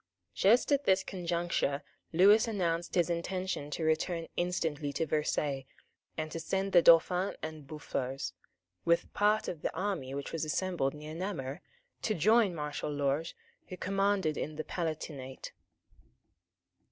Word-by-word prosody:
Just 215 - +4
at 285 0 +3
this 190 0 +4
conjuncture 170 -6 -1 0.3
Lewis 200 +7 +6
announced 175 -6 -1
his 175 -2 +3
intention 175 -2 -2
to 155 +2 -3
return 165 +2 0
instantly 160 -5 -1
to 150 +4 0
Versailles, 145 -3 -1 0.5
and 155 -1 -3
to 165 - -4
send 190 +4 -1
the 175 - +7
Dauphin 180 +3 +5
and 155 -3 -6
Boufflers, 135 - -4 0.5
with 170 0 +1
part 210 +1 +2
of 160 - -4
the - - -1
army 175 -8 -2
which 140 - -5
was 165 - -1
assembled 155 -3 -1
near 150 +1 -8
Namur, 165 -4 -4 0.4
to 215 - 0
join 210 +2 +4
Marshal 150 -1 -3
Lorges 145 +2 -1 0.3
who 185 - -7
commanded 195 -5 +1
in 155 - -3
the 155 - -3
Palatinate. 155 -6 -5
165 Hz, 140 wpm, -31 LUFS, 150-185 Hz, 0.5 s, the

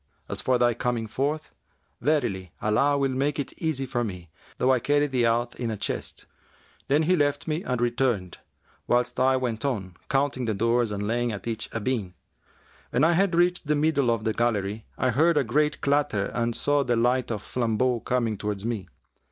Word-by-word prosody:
As - - -4
for 130 -1 +2
thy 120 -1 +3
coming 120 0 -1
forth, 140 +8 -2 0.5
verily 110 - 0
Allah 135 +7 +2
will 135 -1 +1
make 140 +3 0
it 145 - -4
easy 155 -5 -1
to 125 -2 -1
me, 90 -6 -6 0.3
though 130 - +3
I 130 - +3
carry 145 +4 +2
thee 130 -4 +1
out 120 +1 0
in 120 - -1
a 110 - -3
chest." - - -4 0.6
Then 145 +3 +3
he 180 +4 +3
left 145 -2 0
me 155 +2 -1
and 125 -2 -2
returned, 120 -6 0 0.5
whilst 120 0 +1
I 130 +1 +4
went 120 -3 -2
on, 100 -10 -2
counting 135 -2 +1
the 110 -2 -1
doors 115 +2 +2
and 105 0 -3
laying 120 +2 0
at 105 - -6
each 115 -2 -3
a 115 - -3
bean. 105 -6 -2 0.7
When 125 - +1
I 165 - +5
had 185 +1 +2
reached 175 -2 +2
the 150 - +2
middle 145 -4 +2
of 115 -2 0
the 110 -1 0
gallery, 110 -2 -1
I 130 - +1
heard 155 +6 +3
a 145 - +4
great 150 +5 +1
clatter 140 -8 +1
and 120 -1 -1
saw 145 -1 +2
the 120 -2 +1
light 125 +2 +1
of 110 -3 -3
flambeaux 120 +1 0
coming 115 -2 -1
towards 105 -1 -3
me. 115 -5 -3
125 Hz, 195 wpm, -26 LUFS, 110-140 Hz, 0.7 s, I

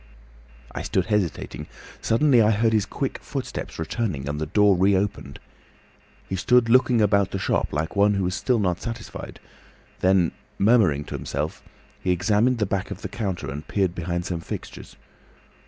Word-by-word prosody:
"I - - -5
stood - - 0
hesitating. 95 -7 -2 0.3
Suddenly 125 +1 +4
I 105 - +4
heard 110 +1 +2
his 105 -2 +2
quick - - -3
footsteps - - -6
returning, 80 - -3
and 75 +1 -3
the 80 - -2
door 105 +3 +4
reopened. 95 +2 0 0.9
He 95 - -3
stood 115 +5 +3
looking 125 -1 +4
about 100 -1 +3
the - - -3
shop 95 - 0
like 75 +5 -2
one 100 +1 +4
who 100 - 0
was 90 0 -1
still 125 +5 +1
not 90 -4 0
satisfied. 115 0 -7 0.6
Then, 90 -2 +3 0.3
murmuring 100 -10 +3
to - - -7
himself, 75 +3 -4 0.4
he - - -2
examined 105 +7 +2
the 110 - +1
back 100 -1 -2
of 100 0 -8
the - - -4
counter 95 - -3
and 75 +2 -7
peered 95 -4 0
behind 85 0 -3
some 90 -3 -3
fixtures. - - -8
100 Hz, 165 wpm, -24 LUFS, 85-110 Hz, 0.9 s, Suddenly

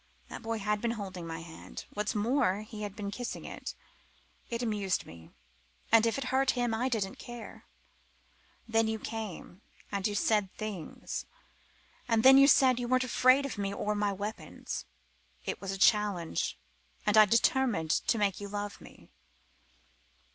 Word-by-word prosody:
That - - -7
boy 225 0 -2
had 210 0 -1
been 235 -1 -1
holding 185 -4 -6
my 165 0 -5
hand: 165 -1 -9
what's 210 +1 -2
more, 210 -2 +2
he 215 0 -9
had 205 -1 -5
been 200 -2 -4
kissing 245 +3 -5
it. - - -7 0.7
It 235 0 -2
amused 205 -5 0
me, 80 0 -13 0.6
and 225 0 +6
if 230 - 0
it 275 - -2
hurt 265 0 +3
him 240 -2 +1
I 245 +4 0
didn't 205 -6 -2
care. 240 -1 -9 1.0
Then 225 0 +2
you 220 0 -1
came. 215 -4 -6 0.3
And 200 -1 0
you 205 - -3
said 205 -2 +2
things. 210 -7 -5 0.8
And 225 -2 +2
then 270 +1 +9
you 275 - +8
said 260 -3 +5
you 245 - -2
weren't 255 +1 +3
afraid 255 +2 +4
of 260 -6 -5
me 200 -1 -1
or 210 +1 -1
my 205 -1 0
weapons. 205 +3 -5 0.6
It - - -3
was 195 - -5
a 195 - -3
challenge. 200 - +2 0.5
And 210 0 +3
I 215 0 +9
determined 230 - +2
to 230 - +2
make 205 -2 0
you 200 - -5
love 205 0 -5
me. - - -15
210 Hz, 165 wpm, -31 LUFS, 200-235 Hz, 1.0 s, then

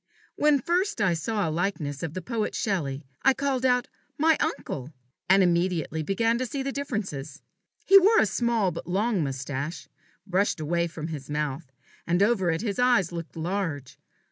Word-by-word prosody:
When 295 -1 +3
first 360 - 0
I 190 -4 +3
saw 205 +4 -1
a - - -1
likeness 155 -5 -2
of 165 -2 -4
the 185 - -4
poet 230 -1 -2
Shelley, 155 - -2 0.2
I 270 -1 +4
called 270 -2 -1
out 250 -1 +2 0.3
"My 320 +2 +4
uncle!" 150 - -3 0.4
and 190 +1 +6
immediately 170 -2 +1
began 225 +8 +1
to 255 - -1
see 275 +1 -3
differences. 210 - -4 0.4
He 390 0 +9
wore 420 +4 +5
a - - +5
small 220 -2 +1
but 165 - -7
long 200 0 +1
moustache, 140 +3 -4 0.4
brushed 195 -1 +1
away 170 +2 0
from 160 -1 -6
his 145 -4 -7
mouth; 150 -1 -3 0.4
and 175 +3 +3
over 205 -5 +2
it 165 +2 0
his 205 -2 -2
eyes 240 -9 +3
looked 170 -2 -7
large. 165 -5 -3
190 Hz, 170 wpm, -26 LUFS, 160-235 Hz, 0.4 s, He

